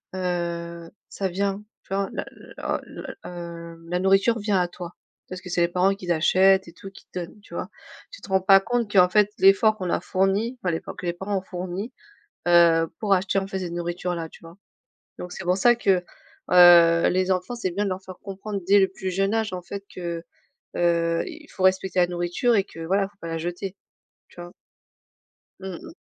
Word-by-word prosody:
heu, 170 -2 -3 0.2
ça 195 - -2
vient, 195 +2 -1 0.2
tu - - -8
vois? 195 0 0
La - - -4
la - - -5
la - - -8
l - - -22
heu, 170 -1 -8
la 180 0 0
nourriture 195 +5 +3
vient 205 -2 +1
à 180 - +1
toi. 175 0 -9 0.4
Parce 185 0 -7
que 185 - -10
c'est 175 - 0
les 170 - +4
parents 185 +3 +2
qui 180 -3 -4
achètent 190 +3 +4
et 170 - -12
tout, 195 +2 -11
qui - - -16
te 185 - -4
donnent, 175 +4 -8
tu 205 - -16
vois? - - -4 0.4
Tu - - -12
te - - -12
rends 190 0 +2
pas 195 +1 +7
compte 230 +1 -2
qu'en 180 -3 +6
fait 210 +1 +4
l'effort 195 +3 +5
qu'on 185 - -5
leur - - -1
fourni, 195 +6 0
enfin 180 - 0
l'effort 165 - -5
que - - -8
les 170 - 0
parents 195 +3 -3
ont - - -2
fourni, 185 +4 -5 0.6
heu, 170 -1 +5
pour 205 -2 +2
acheter, 190 +1 0
en 195 - -1
fait, 195 0 -4
cette 175 -2 -5
nourriture 175 +1 -3
là, 165 -1 -5
tu - - -16
vois? 165 +2 -13 0.6
Donc 180 0 -7
c'est - - -7
pour 180 +1 +1
ça 240 +5 +5
que, 195 -6 +2 0.5
heu, 170 -2 +7
les 185 +1 +1
enfants, 185 +6 -1
c'est 210 -6 -2
bien 200 +4 -1
de 200 - -1
leur 185 0 -4
faire 185 -1 -11
comprendre 200 +1 -5
dès 200 +1 +6
le 190 - +4
plus 190 -1 -5
jeune 195 +3 0
âge, 220 -3 -1
en 180 - -4
fait, 200 +3 -7
que, 170 -2 -5 0.5
heu, 170 -1 +1
il 320 -4 -10
faut 190 - -5
respecter 185 0 +2
la 175 - +4
nourriture 175 +8 0
et 200 - +3
que 180 - -14
voilà, 195 +4 +2
il - - -3
faut 205 - -31
pas 170 - -6
la 165 0 -3
jeter. 175 +3 -5 0.5
Tu 175 - -12
vois? 175 0 -9 1.1
Mmh 190 -1 -6
mh. 330 -1 -11
185 Hz, 225 wpm, -24 LUFS, 175-195 Hz, 1.1 s, pas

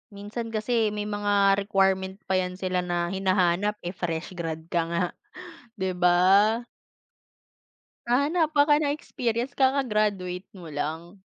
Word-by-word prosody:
Minsan 225 +3 -6
kasi 220 +1 +1
may 210 - -2
mga 205 -1 +2
requirement 190 -1 +1
pa 190 -1 +1
'yan 180 0 -3
sila 185 -1 -1
na 175 -1 -1
hinahanap 190 +1 +1
eh, 175 - -3
fresh 175 -2 -4
grad 160 -1 -4
ka 170 - +2
nga, 170 +1 0 0.8
'di 190 -1 -1
ba? 180 0 +3 1.9
Hahanapan 295 +4 +3
ka 295 - +7
ng 290 -1 0
experience 240 -4 -3
kakagraduate 210 -10 0
mo 170 -4 -10
lang. 160 +6 -5
195 Hz, 125 wpm, -26 LUFS, 180-220 Hz, 1.9 s, ka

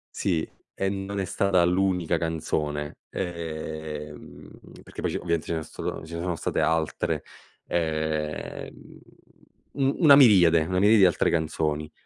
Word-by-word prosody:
Sì, 85 -4 0 0.3
e 95 - -1
non 100 0 -4
è 95 - -1
stata 95 -1 +2
l'unica 90 -2 +1
canzone, 75 -2 -3
ehm, 80 -3 -6 0.3
perché - - -9
poi - - -1
c'è - - -2
ovviamente 85 -2 -1
ce - - -2
ne 80 - -3
so' - - -13
stato - - -5
ce 85 +1 -8
ne 85 - -4
sono 90 -1 -2
state - - -2
altre, 80 -1 0 0.4
ehm, 80 -2 -3 0.7
u 135 0 +1
una 150 -5 +8
miriade, 90 - +6
una 90 +2 0
miriade 105 +3 +5
di 95 - +7
altre 90 - +2
canzoni. 75 -2 -1
85 Hz, 150 wpm, -26 LUFS, 80-95 Hz, 0.7 s, una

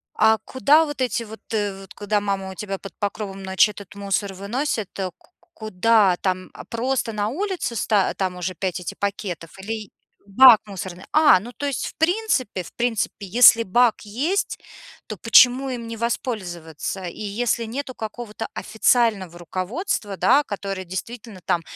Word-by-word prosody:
А 220 0 +4
куда 295 +7 +3
вот 290 -3 -6
эти 235 -2 0
вот 220 0 -11
э 205 -3 -1
вот 190 - -13
куда 205 0 -1
мама 195 -1 -2
у 190 - -10
тебя 195 -1 -4
под 195 -1 -10
покровом 200 -1 -4
ночи 190 +2 +3
этот 200 -1 -12
мусор 200 0 -2
выносит? 215 +2 -2 0.3
Ку - - -27 0.2
куда? 215 -2 +2
Там, 185 -1 -1
а, - - -10
просто 235 0 -1
на 210 0 -1
улице 350 - -3
ста 205 -3 +1
там 185 -2 -2
уже 180 +1 -3
5 185 0 -2
эти 180 - -6
пакетов 195 -4 -4
или 215 0 -5 0.4
бак 230 +3 +8
мусорный? 190 -3 -7
А, 310 -10 +6
ну 230 +6 -9
то 285 - -6
есть 280 -3 -2
в - - -9
принципе, 320 - 0
в - - -13
принципе 225 -4 -2
если 230 +3 +7
бак 235 +3 +3
есть, 275 - -2 0.5
то 215 - -6
почему 250 +5 +5
им 235 -2 -5
не 230 0 -6
воспользоваться? 190 - -4
И 175 - -7
если 225 +3 -1
нету 255 +3 -5
какого-то 220 0 -6
официального 215 -5 +1
руководства 195 - -3
да, 290 +1 +4
которое 195 -4 -5
действительно 210 +2 -7
там 170 - +1
210 Hz, 165 wpm, -23 LUFS, 195-240 Hz, 0.5 s, бак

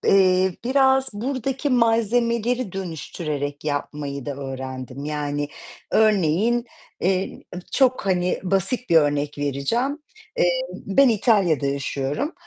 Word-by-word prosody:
eee, 185 -1 +3
biraz 265 +1 +3
buradaki 260 +5 -2
malzemeleri 235 -1 +2
dönüştürerek 155 -5 -5
yapmayı 145 -2 -3
da 145 - -3
öğrendim. 130 0 -6
Yani, 145 -1 -2 0.4
örneğin, 215 +3 +3 0.3
eee, 190 +1 -1 0.3
çok, 255 -5 +2
hani 180 -2 +1
basit 195 +7 +1
bir 165 - +3
örnek 145 -1 +2
vereceğim: 185 - -1 0.4
Eee, - - +2
ben 250 +7 +3
İtalya'da 195 - +2
yaşıyorum. 140 - -2
190 Hz, 100 wpm, -23 LUFS, 145-240 Hz, 0.4 s, eee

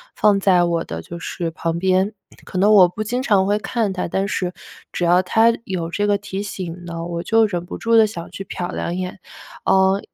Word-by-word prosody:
放 205 -2 +3
在 185 -2 +4
我 170 -1 0
的 80 0 -6
就 170 - -9
是 170 0 -4
旁 165 +1 -3
边， 190 +3 +2 0.3
可 - - -6
能 205 +2 +4
我 185 -4 +8
不 215 +5 -5
经 245 +4 -2
常 200 -6 +3
会 205 +1 +2
看 215 -1 -1
它， 185 - -3
但 195 +3 -1
是 180 -3 -2 0.4
只 175 - -3
要 175 +2 +4
它 225 +5 +4
有 175 -5 -3
这 205 +4 -1
个 205 -1 +2
提 200 0 -5
醒 180 -3 -6
呢， 170 -1 -5
我 170 -1 -4
就 225 +2 +4
忍 175 -3 -4
不 - - -7
住 230 0 +2
地 220 - +7
想 170 -5 -6
去 195 - -7
瞟 175 -1 -5
两 170 - -3
眼。 185 +1 -5 0.5
哦， 190 +1 +4
190 Hz, 235 characters per minute, -20 LUFS, 175-205 Hz, 0.5 s, 我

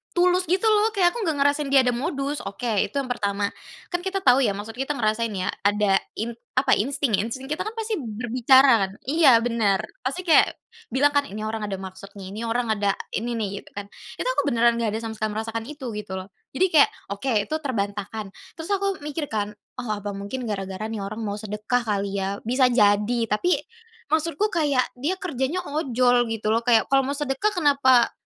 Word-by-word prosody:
tulus 360 0 +3
gitu 370 +5 +1
loh, 435 0 +3
kayak 355 -3 +4
aku 450 -3 -3
nggak 315 - +1
ngerasain 285 0 +1
dia 270 -1 +5
ada 250 - +2
modus, 275 +2 -2
oke 200 - -8 0.2
itu - - -23
yang 275 -3 -1
pertama, 200 -3 -1 0.4
kan 350 - 0
kita 380 +1 -3
tahu 255 -6 +6
ya 210 -7 +2
maksud 210 +3 -6
kita 270 +2 -1
ngerasain 225 -1 0
ya 185 - -1
ada 205 -1 +2 0.2
in 230 +2 -3 0.2
apa, 260 0 +2
insting, 270 +3 0
insting 260 +6 -4
kita 320 +7 -2
kan 445 - -6
pasti 445 -4 -2
berbicara 240 0 +4
kan. - - -12
Iya 270 -5 +5
benar, 225 -5 +1 0.2
pasti 275 +9 -3
kayak 335 -3 +4 0.3
bilang 290 -4 +2
kan 285 -1 +1
ini 215 +2 -6
orang 215 -1 -3
ada 195 - -3
maksud 190 +1 -10
nih, 195 -1 -8
ini 225 +3 -5
orang 235 0 0
ada 205 -2 +1 0.2
ini 235 +2 -2
nih 200 -3 -3
gitu - - -18
kan, 200 0 -7 0.2
itu - - -4
aku 290 - 0
beneran 235 -2 +3
gak 220 -2 -1
ada 220 - -2
sama 225 - -4
sekali 215 -1 -2
merasakan 225 +1 -3
itu 290 -3 -8
gitu 210 -3 -6
loh, 185 - -9 0.3
jadi 375 +8 +3
kayak, 305 -3 +6 0.2
oke 245 +6 -2 0.2
itu 310 - -2
terbantahkan, 205 -3 -3 0.3
terus 320 0 -7
aku 395 -1 0
mikir 300 0 -3
kan, 210 -1 -1 0.3
oh 245 -3 -5
apa 205 0 -4
mungkin 200 +6 -5
gara-gara 195 0 -4
nih 220 - -4
orang 215 +3 -5
mau 205 -1 -2
sedekah 210 +3 -1
kali 200 -2 -1
ya, 200 +1 -3
bisa 255 +1 +4
jadi, 210 +1 +3
tapi 350 +14 +1 0.5
maksudku 325 +6 +1
kayak 290 -7 +2 0.2
dia 310 +8 0
kerjanya 315 -2 -2
ojol 255 -5 +2
gitu 220 -1 -3
loh, - - +3
kayak 230 -2 +4
kalau 270 0 +5
mau 280 - -1
sedekah 290 +8 0
kenapa 280 -6 +4
245 Hz, 200 wpm, -24 LUFS, 210-290 Hz, 0.5 s, tahu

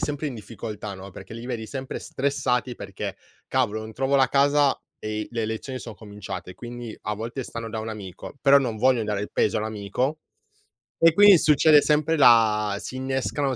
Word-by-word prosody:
sempre 150 -1 -2
in 130 - -7
difficoltà, 105 -1 -7
no, 95 +1 -10
perché 95 +3 -11
li 115 - -8
vedi 115 -3 -4
sempre 130 +1 -5
stressati, 130 -2 -1
perché: 100 -1 -6 0.3
"Cavolo, 115 -5 0
non 110 0 -8
trovo 135 +4 -1
la 135 -1 +4
casa 140 0 +3 0.2
e 110 0 -3
le 115 -2 -2
lezioni 130 +4 -5
son 115 - -8
cominciate". 105 -3 -8
Quindi, 120 -2 -8
a 105 - -2
volte, 115 +5 -5
stanno 115 -1 -6
da 110 - -4
un 110 - -5
amico, 100 -5 -8
però 140 0 +7
non 120 -5 -2
vogliono 125 -2 +3
dare 105 -1 -2
il 105 - -6
peso 105 - +1
all'amico 110 +8 -2 0.8
e 165 -1 +7
quindi 200 0 +8
succede 150 0 +5
sempre 155 +1 +2
la 110 -5 +5
si 130 - -7
innescano 135 +1 -1
120 Hz, 180 wpm, -25 LUFS, 110-135 Hz, 0.8 s, quindi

